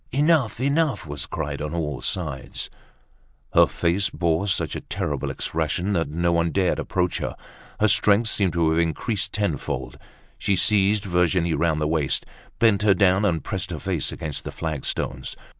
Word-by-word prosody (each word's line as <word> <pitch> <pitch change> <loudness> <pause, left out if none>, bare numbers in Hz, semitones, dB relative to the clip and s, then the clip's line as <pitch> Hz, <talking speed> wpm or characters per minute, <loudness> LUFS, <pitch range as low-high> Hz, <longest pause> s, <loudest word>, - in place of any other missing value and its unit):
"Enough! 145 -5 +2
Enough!" 140 - +1
was 75 -1 -6
cried - - -4
on 75 +2 -3
all 75 -5 -3
sides. 75 -8 -4 0.8
Her - - +6
face 90 +4 0
bore 85 +3 0
such 95 - -1
a - - -4
terrible 75 -3 -3
expression, 80 +5 -1
that 80 -5 0
no 85 +3 0
one 85 0 +2
dared 95 +1 +1
approach 90 -2 -1
her. - - -3 0.4
Her 110 - +4
strength 105 +1 +4
seemed 100 -4 +2
to 85 -2 +2
have 80 - +2
increased 95 +5 -1
tenfold. 100 -9 -3 0.4
She 100 - +1
seized 100 +2 +3
Virginie 90 -2 +2
round 80 0 +1
the 75 - 0
waist, 75 -3 +1 0.3
bent 110 -4 +4
her 105 -2 +4
down 95 0 +3
and 85 -5 0
pressed 95 -3 -3
her 85 - -4
face 85 -4 -1
against 75 -3 -4
the - - -5
flagstones. 70 -4 -3
90 Hz, 165 wpm, -24 LUFS, 80-100 Hz, 0.8 s, Her